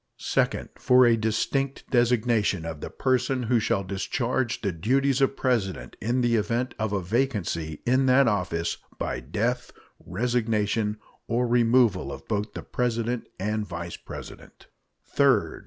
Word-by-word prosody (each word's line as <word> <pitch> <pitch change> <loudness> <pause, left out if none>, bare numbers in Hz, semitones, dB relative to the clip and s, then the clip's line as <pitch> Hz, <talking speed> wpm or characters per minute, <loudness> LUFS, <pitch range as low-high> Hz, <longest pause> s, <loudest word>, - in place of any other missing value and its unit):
Second. - - 0
For 125 0 +5
a 120 -1 +5
distinct 115 +5 -1
designation 120 -7 +2
of 80 -3 -6
the - - -5
person 130 -1 0
who 120 0 +2
shall 100 -2 0
discharge 120 +6 -2
the 100 - 0
duties 135 - +1
of 135 0 +2
President 115 -8 -1
in 120 +3 0
the 120 -1 +2
event 115 +4 -1
of 110 -2 -1
a 100 -3 -1
vacancy 90 - -1
in 130 +2 +3
that 130 +1 +5
office 90 -6 -1 0.2
by - - -2
the 65 - -11
death, 115 - -1 0.3
resignation, 110 0 0 0.3
or 120 +2 +1
removal 115 - +3
of 70 - -9
both 105 -1 -2
the - - -5
President 120 -1 -2
and 105 +2 -1
Vice 85 -1 -6
President. - - -11 0.4
Third. - - +2
115 Hz, 145 wpm, -26 LUFS, 100-125 Hz, 0.4 s, For